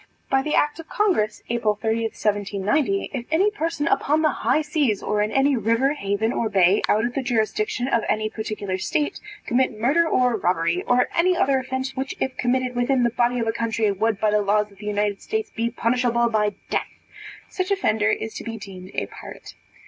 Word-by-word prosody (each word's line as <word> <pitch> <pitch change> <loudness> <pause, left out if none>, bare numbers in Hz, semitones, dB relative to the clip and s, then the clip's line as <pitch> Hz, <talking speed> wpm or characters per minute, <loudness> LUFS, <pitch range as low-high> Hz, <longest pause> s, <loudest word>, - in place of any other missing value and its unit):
By 270 0 +4
the 300 +2 -1
act 295 +2 +1
of 325 - -10
congress, 370 - 0
April 230 -3 +1
30, 225 +1 0
1790, 210 - 0
if 245 -3 -4
any 380 +7 +3
person 330 -6 -2
upon 305 +2 +2
the 310 - +4
high 310 - +1
seas, 290 -9 0
or 210 0 0
in 210 - +1
any 270 +1 +3
river, 230 +5 +2
haven, 205 -2 -1
or 225 - -1
bay, 190 0 +4
out 215 +2 +3
of 245 - -3
the 275 - -1
jurisdiction 240 0 -1
of 235 -4 +2
any 215 0 +1
particular 215 -3 -4
state, 295 +9 -1 0.3
commit 245 -3 +1
murder 300 +9 +3
or 250 -2 +2
robbery, 175 -2 0
or 250 0 +3
any 360 +1 +3
other 270 -5 +3
offence 260 0 -4
which 265 0 -3
if 260 -1 -2
committed 250 0 0
within 245 +1 +2
the 235 - +2
body 240 +1 +1
of 230 - 0
a 225 - +1
county, 225 -2 0
would 210 +1 0
by 215 -1 +2
the 210 0 +3
laws 210 +1 +1
of 200 - -20
the 210 - -8
United 205 -1 -1
States, 440 0 -3
be 230 0 0
punishable 235 0 +1
by 210 -2 +1 0.2
death, - - 0 0.6
such 370 0 -3
offender 220 - +1
is 220 0 -2
to - - -7
be 225 -1 -5
deemed 190 -3 -10
a - - -1
pirate. - - -11
235 Hz, 200 wpm, -23 LUFS, 210-270 Hz, 0.6 s, By